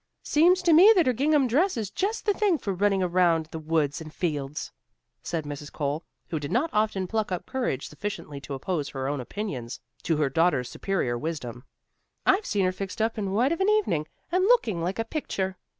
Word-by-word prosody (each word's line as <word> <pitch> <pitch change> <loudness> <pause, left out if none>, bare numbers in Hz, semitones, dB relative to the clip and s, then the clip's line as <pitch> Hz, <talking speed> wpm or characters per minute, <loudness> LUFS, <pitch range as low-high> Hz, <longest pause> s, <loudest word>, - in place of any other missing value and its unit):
"Seems 355 +4 +4
to 340 -2 +5
me 370 +8 +9
that 355 -4 +4
her 255 - +3
gingham 280 +2 +3
dress 310 - +2
is 210 -3 -3
just 415 - -2
the 415 - +3
thing 400 -5 +2
for 200 -8 -3
running 195 0 +2
around 175 -2 +3
in 155 - -11
the 160 - -5
woods 155 -2 0
and 155 -1 -8
fields," 150 -4 -3 0.5
said 165 -2 -3
Mrs. 145 0 -7
Cole, 150 +2 -2 0.3
who 165 -3 -2
did 145 -1 -5
not 290 +8 +1
often 210 -3 +1
pluck 215 +1 -2
up 180 - -3
courage 240 - -2
sufficiently 150 -4 -6
to 140 - -6
oppose 150 +1 -2
her 135 -1 -4
own 140 -1 -2
opinions 130 - -5 0.2
to 160 - 0
her 150 -2 +2
daughter's 140 -3 +1
superior 130 -12 -1
wisdom. 125 -5 -5 0.6
"I've 395 +2 +3
seen 200 -3 +1
her 185 - +2
fixed 195 +2 -6
up 220 0 0
in 200 -2 -2
white 240 +8 +2
of 335 - -1
an 385 - +3
evening, 390 - +1 0.2
and 365 +1 +2
looking 240 - +3
like 180 +3 -2
a 225 - -1
picture. 190 - -3
185 Hz, 210 wpm, -26 LUFS, -, 0.6 s, me